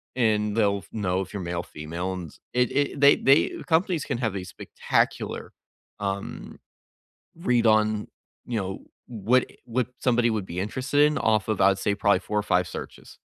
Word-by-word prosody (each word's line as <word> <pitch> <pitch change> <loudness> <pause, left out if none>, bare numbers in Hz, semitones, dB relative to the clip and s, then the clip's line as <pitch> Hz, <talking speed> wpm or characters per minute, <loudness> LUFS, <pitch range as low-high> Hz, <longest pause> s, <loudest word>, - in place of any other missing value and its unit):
And 105 -4 +1
they'll 100 -3 +2
f - - -17
know 95 -4 -1
if 95 - -8
you're 100 - -4
male, 85 0 -3
female, 85 +5 -5
and 90 -5 -7 0.2
it 125 -1 +2
it 140 0 0
they 140 0 +7
they 135 +2 +4 0.2
companies 170 -1 +2
can 140 - -2
have 115 -5 -1
a 95 - -3
spectacular, 90 0 -2 0.5
um, 100 -1 -5 0.8
read 125 -9 +1
on, 110 -1 +2 0.4
you 120 -2 -2
know, 95 0 -5 0.3
what 120 +2 +2 0.2
what 120 0 -1
somebody 120 -1 +2
would 105 -4 -2
be 90 +1 -4
interested 130 +8 -1
in 150 0 +3
off 110 -2 +1
of, 110 - -1
I'd 95 0 +4
say, 100 +1 0
probably 100 0 +2
4 105 - -2
or - - +1
5 90 -3 +1
searches. - - -9
105 Hz, 175 wpm, -25 LUFS, 95-125 Hz, 0.8 s, they